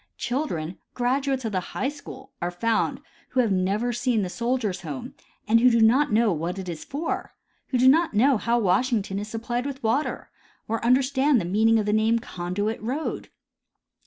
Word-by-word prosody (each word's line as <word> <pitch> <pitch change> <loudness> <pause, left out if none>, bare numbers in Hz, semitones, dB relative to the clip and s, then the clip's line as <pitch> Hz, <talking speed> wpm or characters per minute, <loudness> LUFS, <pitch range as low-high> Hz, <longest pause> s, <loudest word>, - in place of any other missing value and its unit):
Children, 190 - -3 0.2
graduates 260 +1 0
of 220 - -2
the 190 - 0
high 255 +8 -3
school, 285 -2 -11
are 175 - -1
found 230 +8 0 0.3
who 260 - -1
have 230 -4 +3
never 200 +6 0
seen 240 -3 0
the 185 - -3
Soldiers' 235 -5 -1
Home 145 -6 -6 0.3
and 225 +2 +5
do 235 -1 +5
not 250 +5 +4
know 220 0 +3
what 170 +4 -3
it 190 -1 -6
is 165 -3 -5
for; 295 +4 -4 0.3
who 255 - 0
do 255 +1 +4
not 315 -1 +4
know 260 +4 +4
how 235 +2 +1
Washington 205 -1 +1
is 205 - -5
supplied 240 +3 -3
with 270 -2 -7
water, 235 +7 -1 0.4
or 225 +1 -2
understand 265 +2 +3
the 175 - -3
meaning 220 +5 +3
of 215 - 0
the 210 - +1
name 220 +2 +3
Conduit 205 +1 -3
road. 265 +8 -3
230 Hz, 180 wpm, -25 LUFS, 205-260 Hz, 0.4 s, and